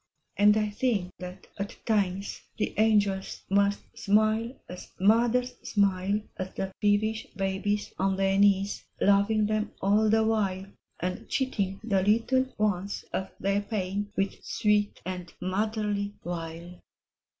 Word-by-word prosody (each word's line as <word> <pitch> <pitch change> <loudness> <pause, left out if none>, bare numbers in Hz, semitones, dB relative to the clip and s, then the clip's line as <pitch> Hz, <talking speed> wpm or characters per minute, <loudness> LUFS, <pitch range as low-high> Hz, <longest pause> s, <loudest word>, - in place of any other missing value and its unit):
And 210 +1 +5
I 210 -1 0
think 205 -5 0
that 180 +1 -8
at 200 +1 -4
times 200 -3 0 0.2
the - - -1
angels 205 -3 +2
Must 200 0 +3
smile 215 +4 +2
as 180 - -9
mothers 240 +5 +3
smile 200 0 +1 0.2
At 185 0 -5
the 190 0 -3
peevish 215 +1 +1
babies 195 +2 -1
on 195 0 +2
their 195 0 +2
knees, 200 0 +3 0.2
Loving 200 +2 +4
them 215 0 -1
all 210 +2 +3
the 220 +1 +4
while, 200 -4 0 0.4
And 180 +1 -3
cheating 200 -8 -1
the 200 -4 +2
little 230 +6 +2
ones 200 -2 -1
of 190 - -2
their 200 +1 +1
pain 205 -1 -3
U 195 - +4
ith 195 - -8
sweet 210 -1 +1
and 180 -1 -5
motherly 205 +1 -1
wile. 170 0 -6
205 Hz, 135 wpm, -28 LUFS, 190-215 Hz, 0.4 s, And